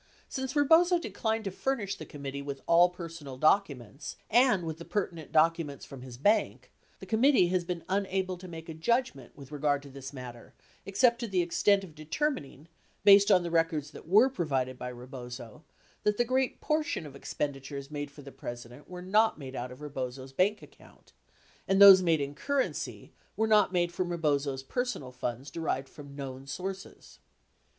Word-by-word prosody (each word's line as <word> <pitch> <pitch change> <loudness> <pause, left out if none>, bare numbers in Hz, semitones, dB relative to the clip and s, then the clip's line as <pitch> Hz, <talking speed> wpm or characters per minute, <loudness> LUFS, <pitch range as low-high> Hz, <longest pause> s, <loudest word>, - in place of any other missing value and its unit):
Since 265 +1 -4
Rebozo 330 +5 +5
declined 225 -9 -2
to 195 - -3
furnish 210 -2 -2
the - - -10
committee 140 -2 -6
with 140 -1 -6
all 170 +1 +6
personal 165 -6 -8
documents 140 - 0 0.2
and 240 -5 +4
with 160 0 -5
the - - -7
pertinent 170 -5 -3
documents 160 -3 +1
from 135 -2 -10
his 125 -2 -10
bank, 205 - +1 0.3
the - - -9
committee 230 -4 +4
has 180 -1 +1
been 170 -1 -4
unable 190 -1 -1
to 185 - -10
make 165 -2 -9
a 165 - -6
judgment 160 - -1
with 140 -1 -12
regard 145 -1 0
to 140 - -12
this 135 0 -8
matter 125 -3 -10 0.3
except 235 +4 +3
to 235 - -3
the 185 -4 +1
extent 195 +3 +2
of 175 -5 -11
determining, 155 - -3 0.4
based 200 0 +7
on 185 -3 +5
the 170 - -4
records 165 -3 0
that - - -12
were 210 +8 +6
provided 135 - -1
by 125 0 -6
Rebozo, 125 +1 -9 0.4
that 210 0 +1
the 240 - +2
great 255 +1 0
portion 305 - -1
of 140 -2 -10
expenditures 140 0 -5
made 145 -1 -4
for 145 +1 -14
the 140 - -10
President 120 +3 -9
were 180 0 -8
not 215 +4 +3
made 135 -3 -8
out 125 0 -4
of 130 +3 -12
Rebozo's 130 -2 -6
bank 200 +7 +1
account, - - -18 0.5
and 195 0 +2
those 195 -2 +11
made 165 -4 +2
in 140 0 -3
currency 275 - -3 0.2
were 220 - +2
not 215 -3 +4
made 175 -1 +1
from 175 0 -2
Rebozo's 145 -5 0
personal 245 - -3
funds 125 +2 -5
derived 140 -4 -2
from 140 -2 -12
known 135 -1 -7
sources. 190 +7 -7
165 Hz, 175 wpm, -29 LUFS, 140-200 Hz, 0.5 s, those